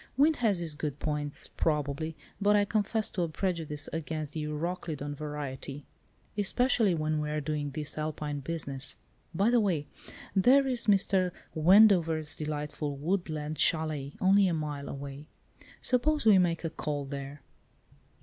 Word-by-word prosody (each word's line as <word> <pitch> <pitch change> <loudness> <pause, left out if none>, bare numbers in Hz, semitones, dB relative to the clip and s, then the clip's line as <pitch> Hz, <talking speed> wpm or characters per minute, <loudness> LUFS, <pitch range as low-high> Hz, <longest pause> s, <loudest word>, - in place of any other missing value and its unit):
Wind 300 +3 +4
has 205 -8 +2
its 160 -2 +2
good 150 -2 -4
points, 150 -1 -1
probably, 150 +1 -1 0.3
but 205 +1 +4
I 205 0 +4
confess 215 +1 0
to 185 - -2
a 170 - 0
prejudice 160 -4 -2
against 155 -2 -4
the 155 - -3
Euroclydon 150 -1 -3
variety. 145 -1 -6 0.5
Especially 215 -1 +2
when 155 -1 -1
we 150 - -3
are 150 0 -1
doing 150 0 -2
this 150 +1 -2
Alpine 150 -1 -3
business. 140 -2 -3 0.4
By 200 +7 +3
the 245 - +5
way, 175 -9 0 0.5
there 260 +8 +5
is 250 -3 0
Mr. 195 -2 +3 0.2
Wendover's 165 -3 +5
delightful 150 -1 -4
woodland 155 -2 -2
châlet—only 160 +5 +2
a 175 - 0
mile 150 -2 -4
away. 140 +1 -7 0.5
Suppose 290 +3 +2
we 210 -4 +7
make 170 -2 +1
a 165 - -2
call 145 -2 -3
there." 140 +1 -7
155 Hz, 140 wpm, -29 LUFS, 150-190 Hz, 0.5 s, we